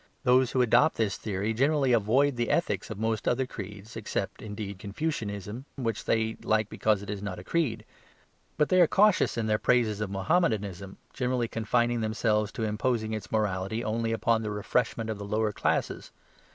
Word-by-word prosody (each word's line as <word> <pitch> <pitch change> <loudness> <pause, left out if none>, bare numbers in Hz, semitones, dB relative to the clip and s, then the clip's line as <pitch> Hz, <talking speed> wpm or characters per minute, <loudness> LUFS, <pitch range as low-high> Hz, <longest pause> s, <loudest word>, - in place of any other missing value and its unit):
Those 125 0 +4
who 130 0 +2
adopt 125 +7 +4
this 110 -3 0
theory 105 +1 -2
generally 135 +2 +2
avoid 125 +6 +3
the 120 -1 -1
ethics - - 0
of - - -5
most 110 0 -1
other 130 +2 +2
creeds, 105 -1 -9
except, - - -3
indeed, 105 -2 -6
Confucianism, 105 - -4
which 115 -5 -3
they 110 0 0
like 110 -1 +1
because 105 -2 +1
it 100 - -9
is 100 -1 -5
not 100 -3 -4
a 90 - -9
creed. 115 - -1 0.7
But 150 -1 +2
they 185 -1 +5
are 170 - +6
cautious 205 - +3
in 115 - 0
their 105 -1 +1
praises 110 -4 +2
of 105 - -2
Mahommedanism, 100 - 0 0.2
generally 125 -2 0
confining 120 +1 0
themselves 110 -1 0
to 115 - -3
imposing 110 +1 -1
its 110 -3 -5
morality 105 +1 -1
only 115 +1 -1
upon 115 0 +1
the 110 - -3
refreshment 110 +2 -1
of 105 - -5
the - - -5
lower 105 +1 0
classes. - - -1
110 Hz, 180 wpm, -28 LUFS, 105-125 Hz, 0.7 s, are